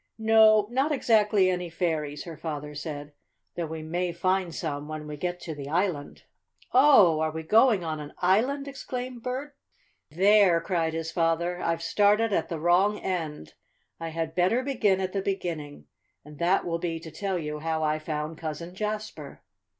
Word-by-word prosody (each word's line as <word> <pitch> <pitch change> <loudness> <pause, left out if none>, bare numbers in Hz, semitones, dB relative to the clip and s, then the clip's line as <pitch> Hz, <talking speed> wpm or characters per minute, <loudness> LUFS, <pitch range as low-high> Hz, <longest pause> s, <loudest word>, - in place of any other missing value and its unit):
"No, 220 -1 +5
not 270 +5 +1
exactly 215 -7 +3
any 180 -1 -1
fairies," 160 -4 -2
her 165 -2 -8
father 150 -2 -5
said; 145 -1 -6 0.4
"though 170 -2 -3
we 160 0 -6
may 175 +3 -2
find 185 0 -1
some 145 -2 -4
when 155 0 -6
we 150 0 -6
get 175 +4 -3
to 160 - -5
the 140 -1 -7
island." 165 -3 -2 0.5
"Oh, 250 - +6
are 160 0 +1
we 160 +1 -6
going 220 +2 +4
on 160 -2 -3
an 150 0 -9
island?" 250 +10 +1
exclaimed 255 -3 -6
Bert. 260 +4 -5 0.5
"There!" 190 +1 +5
cried 165 -2 -1
his 165 0 -3
father, 170 +1 0
"I've 165 0 -1
started 210 +1 +3
at - - 0
the 165 -3 -4
wrong 180 +6 +3
end. 160 - -4 0.5
I 165 0 -4
had 160 0 -3
better 185 +9 +2
begin 220 -8 +1
at 185 -1 -3
the 195 - -1
beginning. 165 - -4 0.4
And 150 -1 -13
that 180 +3 +2
will 170 -1 -2
be 165 -1 -3
to 160 0 -10
tell 190 +4 -2
you 150 -2 -4
how 160 0 -2
I 155 0 +1
found 155 0 -4
Cousin 165 +2 -5
Jasper. 215 +2 -5
175 Hz, 175 wpm, -27 LUFS, 155-205 Hz, 0.5 s, Oh